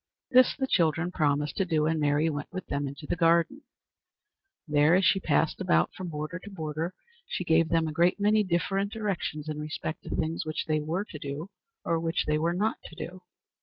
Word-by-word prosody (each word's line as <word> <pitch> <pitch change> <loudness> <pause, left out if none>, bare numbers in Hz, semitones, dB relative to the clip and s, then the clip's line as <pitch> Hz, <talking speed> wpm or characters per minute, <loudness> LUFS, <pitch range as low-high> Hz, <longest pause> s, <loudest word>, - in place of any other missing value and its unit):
This 255 0 +6
the 270 - 0
children 170 - +1
promised 150 -3 0
to 195 - +2
do, 155 -3 +1
and 160 0 +1
Mary 145 +1 +2
went 150 -2 -3
with 185 -1 -5
them 140 0 -2
into 140 +2 -8
the - - -1
garden. 170 - +3 1.1
There, 150 +2 +4
as 190 +1 +3
she 195 - +4
passed 75 - +1
about 80 +1 +2
from 185 - -6
border 155 +3 -4
to 200 - -10
border, 160 -1 -4 0.3
she - - -3
gave 165 -1 +3
them 165 -1 +2
a - - -3
great 175 +5 +3
many 210 +1 +4
different 195 +2 0
directions 190 -8 -3
in 155 -1 -4
respect 155 +1 -4
to - - -7
things 160 +1 -1
which 155 0 -3
they 155 -1 +1
were 165 +7 -2
to 155 - -9
do, 145 +6 -6 0.3
or 165 - +1
which 165 0 -1
they 150 0 +1
were 165 +2 +1
not 215 +4 0
to 160 - -10
do. 180 +2 -7
165 Hz, 205 wpm, -28 LUFS, 150-185 Hz, 1.1 s, This